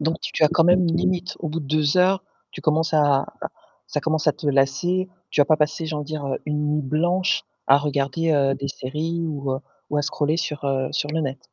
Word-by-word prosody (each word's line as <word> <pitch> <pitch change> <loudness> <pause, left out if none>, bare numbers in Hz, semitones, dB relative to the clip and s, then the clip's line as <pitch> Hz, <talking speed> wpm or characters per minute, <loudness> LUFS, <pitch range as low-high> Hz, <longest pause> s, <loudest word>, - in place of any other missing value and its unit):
Donc 160 +2 0
tu - - -3
as - - +6
quand 165 - +3
même 180 +2 +5
une 165 - +1
limite 180 0 -1
au 165 - -3
bout 160 +2 -3
de 145 - -8
2 150 +2 +1
heures, 190 +1 +4 0.3
tu - - -9
commences 160 0 +1
à 145 -3 +3 0.6
ça - - -2
commence 160 -1 -1
à 150 - +5
te 150 - -8
lasser. 145 +7 +1 0.2
Tu 145 - +2
vas - - +7
pas 155 +2 +3
passer 155 +2 0
j'ai 155 - -3
envie 150 - -3
de - - -15
dire, 155 -2 -4
heu, 135 - -2
une 150 0 -1
nuit 150 0 0
blanche 175 +7 +1 0.2
à 140 +1 +6
regarder, 145 +2 0
heu, 135 -2 +3
des 140 0 -4
séries 155 +6 -3
ou 140 -4 -3
heu, 130 - -2 0.3
ou 150 - 0
à 145 - +1
scroller 150 +2 0
sur, 150 -3 -3
heu, 135 -1 0
sur 145 - -1
le 160 +1 -1
net? 135 -3 -3
150 Hz, 245 wpm, -23 LUFS, 140-165 Hz, 0.6 s, vas